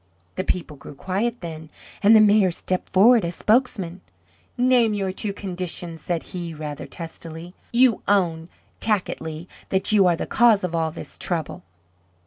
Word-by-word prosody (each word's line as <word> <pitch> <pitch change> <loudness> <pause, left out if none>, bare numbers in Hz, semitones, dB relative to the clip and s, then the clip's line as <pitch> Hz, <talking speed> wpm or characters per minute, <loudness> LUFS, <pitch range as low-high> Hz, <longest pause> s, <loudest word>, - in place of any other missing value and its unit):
The 185 - -3
people 165 -5 -3
grew 140 - -11
quiet 205 - -2
then, 160 -2 -8 0.3
and 215 +3 +6
the - - +8
Mayor 210 -2 +5
stepped 180 +1 -3
forward 225 +4 +5
as 170 0 -3
spokesman, 205 -7 0 0.6
"Name 245 -3 +3
your 195 -2 -1
two 200 +2 -3
conditions," 180 -4 -5
said 170 -2 -2
he 170 -3 -5
rather 150 -2 -6
testily. 165 +1 -9 0.2
"You 240 -2 +4
own, 175 -5 +1 0.3
tacitly, 170 -6 -2 0.2
that 190 +3 +2
you 200 -3 +5
are 175 - +3
the - - -4
cause 225 -4 +4
of 180 -2 -2
all 165 -1 0
this 160 - -9
trouble." 165 - -3
185 Hz, 155 wpm, -23 LUFS, 165-210 Hz, 0.6 s, the